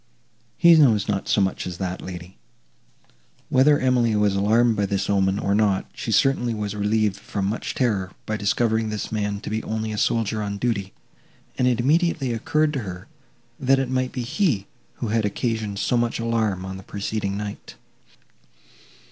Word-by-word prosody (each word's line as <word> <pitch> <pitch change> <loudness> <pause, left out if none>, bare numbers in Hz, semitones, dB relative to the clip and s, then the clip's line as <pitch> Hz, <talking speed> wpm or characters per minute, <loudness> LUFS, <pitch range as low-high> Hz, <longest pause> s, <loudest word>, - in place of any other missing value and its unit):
"He 170 -1 +7
knows 115 -9 +4
not 100 -2 -1
so 105 - +3
much 95 -1 -1
as 90 -2 -6
that, 95 0 -4
lady." 90 0 -9 1.1
Whether 145 +3 +5
Emily 125 -4 +2
was 105 -1 +2
alarmed 110 +4 +3
by 100 -1 0
this 100 0 -1
omen, 95 -1 +2
or 100 - 0
not, 100 -2 +2
she 115 - -4
certainly 120 0 +2
was 105 -1 -3
relieved 105 -1 +1
from 100 -1 -4
much 105 +4 -3
terror 100 -7 0
by 110 - -2
discovering 110 +1 +1
this 105 -1 -4
man 105 -2 -2
to - - -6
be 110 +1 -1
only 110 0 -3
a 105 - -3
soldier 110 -1 0
on 100 -1 -3
duty, 100 -4 -1 0.6
and 125 - +1
it 120 -2 +2
immediately 150 -1 +1
occurred 155 +5 +1
to 140 - -1
her, 90 -5 -7 0.5
that 135 +1 +3
it 135 -1 -1
might 130 0 0
be 125 - -4
he, 120 - 0 0.3
who 115 - -4
had 110 0 +1
occasioned 105 -1 -2
so 125 - 0
much 120 0 0
alarm 110 -5 0
on 95 0 -6
the - - -9
preceding 100 0 -3
night. 105 -1 -7
110 Hz, 175 wpm, -23 LUFS, 100-120 Hz, 1.1 s, He